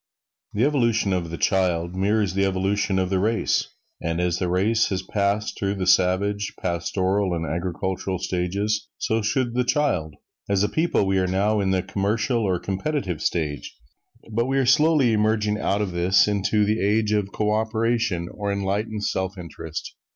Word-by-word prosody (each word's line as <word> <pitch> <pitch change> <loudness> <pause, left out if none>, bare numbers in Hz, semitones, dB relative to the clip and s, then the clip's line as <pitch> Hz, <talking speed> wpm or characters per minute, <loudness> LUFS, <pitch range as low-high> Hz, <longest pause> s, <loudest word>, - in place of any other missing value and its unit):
The 105 - +1
evolution 115 -8 +2
of 85 -2 -2
the 85 - -5
child 90 -3 +1
mirrors 100 +1 +1
the 100 +1 +1
evolution 95 +1 0
of 95 0 0
the 95 - +2
race. 110 +4 +1 0.3
And 85 +1 -2
as 90 0 0
the 90 - -1
race 105 +6 +2
has 95 -1 -2
passed 100 +2 -1
through 100 0 -1
the 95 -2 -2
savage, 95 +3 +2
pastoral 95 +2 0
and 85 0 -3
agricultural 95 +3 -3
stages, 95 +4 -1
so 110 +1 0
should 120 +3 0
the 125 +1 +1
child. 120 - 0 0.3
As 100 -1 +2
a 105 - +1
people 160 -10 +1
we 95 0 +1
are 95 - +1
now 100 +4 +1
in 95 -1 0
the 95 -1 +1
commercial 105 +5 0
or 95 -4 +1
competitive 95 - -3
stage, 75 -4 -2 0.5
but 115 +3 0
we 135 +1 0
are 135 - +2
slowly 145 -2 +4
emerging 105 0 +1
out 105 +1 0
of 95 - -3
this 90 +3 +3
into 105 +1 +1
the 110 +2 0
age 105 +1 +2
of 105 -2 0
co 105 +1 0
operation 110 -4 0
or 100 -1 -3
enlightened 100 +2 -2
self 95 0 -2
interest. 80 -2 -7
100 Hz, 175 wpm, -24 LUFS, 95-110 Hz, 0.5 s, slowly